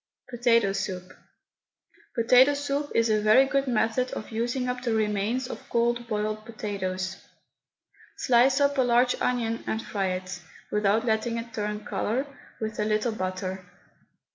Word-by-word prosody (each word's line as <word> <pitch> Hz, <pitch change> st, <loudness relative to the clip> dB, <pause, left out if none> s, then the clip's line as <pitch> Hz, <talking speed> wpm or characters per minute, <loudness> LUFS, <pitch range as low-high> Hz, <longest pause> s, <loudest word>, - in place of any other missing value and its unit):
POTATO 230 Hz, -4 st, +3 dB
SOUP. 185 Hz, -2 st, -4 dB, 1.0 s
Potato 250 Hz, +4 st, +5 dB
soup 285 Hz, 0 st, -2 dB
is 230 Hz, 0 st, +4 dB
a 215 Hz, -1 st, +2 dB
very 215 Hz, +6 st, +6 dB
good 275 Hz, 0 st, 0 dB
method 240 Hz, +1 st, +1 dB
of 215 Hz, -, -6 dB
using 240 Hz, +3 st, -1 dB
up 250 Hz, 0 st, -2 dB
the 235 Hz, -3 st, 0 dB
remains 215 Hz, +4 st, 0 dB
of -, -, -9 dB
cold 235 Hz, 0 st, +1 dB
boiled 215 Hz, -1 st, -2 dB
potatoes. 190 Hz, -4 st, -4 dB, 1.0 s
Slice 255 Hz, +2 st, +4 dB
up 285 Hz, -1 st, +2 dB
a -, -, +6 dB
large 245 Hz, 0 st, +3 dB
onion 230 Hz, -2 st, 0 dB
and 220 Hz, -, -1 dB
fry 200 Hz, -3 st, -2 dB
it, 185 Hz, -1 st, -4 dB, 0.3 s
without 210 Hz, +2 st, +2 dB
letting 230 Hz, +1 st, 0 dB
it 230 Hz, 0 st, -6 dB
turn 210 Hz, 0 st, -3 dB
colour, 250 Hz, +6 st, -1 dB, 0.3 s
with 220 Hz, -1 st, -4 dB
a -, -, +2 dB
little 215 Hz, +2 st, +1 dB
butter. 185 Hz, -2 st, -4 dB
225 Hz, 145 wpm, -26 LUFS, 210-250 Hz, 1.0 s, very